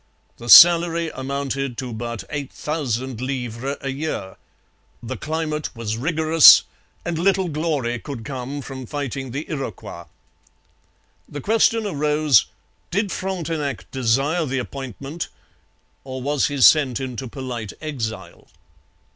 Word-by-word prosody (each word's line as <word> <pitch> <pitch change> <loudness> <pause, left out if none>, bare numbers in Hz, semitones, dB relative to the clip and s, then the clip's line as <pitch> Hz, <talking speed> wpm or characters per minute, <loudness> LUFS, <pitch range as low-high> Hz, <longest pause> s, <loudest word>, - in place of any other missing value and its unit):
The 120 - -9
salary 170 0 +8
amounted 135 -1 -3
to 125 -3 -5
but 115 0 -5
eight 145 -3 -4
thousand 130 -5 -3
livres 130 0 -4
a 135 - -4
year. 135 -9 -4 0.7
The 125 +3 -5
climate 155 0 -3
was 110 -2 -3
rigorous, 160 +4 +6 0.4
and 170 -2 -2
little 190 +1 +2
glory 145 -7 -2
could 125 -6 -8
come 135 +2 -5
from 130 -2 -8
fighting 135 -1 -4
the 140 +6 -5
Iroquois. 115 - -6 1.2
The 145 - -6
question 225 +2 +2
arose, 150 - +3 0.4
did 200 +1 -1
Frontenac 165 -7 -4
desire 135 +7 +1
the 135 +1 -2
appointment 135 +4 -6 0.8
or 130 -1 -6
was 140 +2 0
he 145 -1 -4
sent 135 -4 +5
into 130 -1 -5
polite 120 -4 -6
exile? 110 - -6
140 Hz, 120 wpm, -22 LUFS, 125-155 Hz, 1.2 s, salary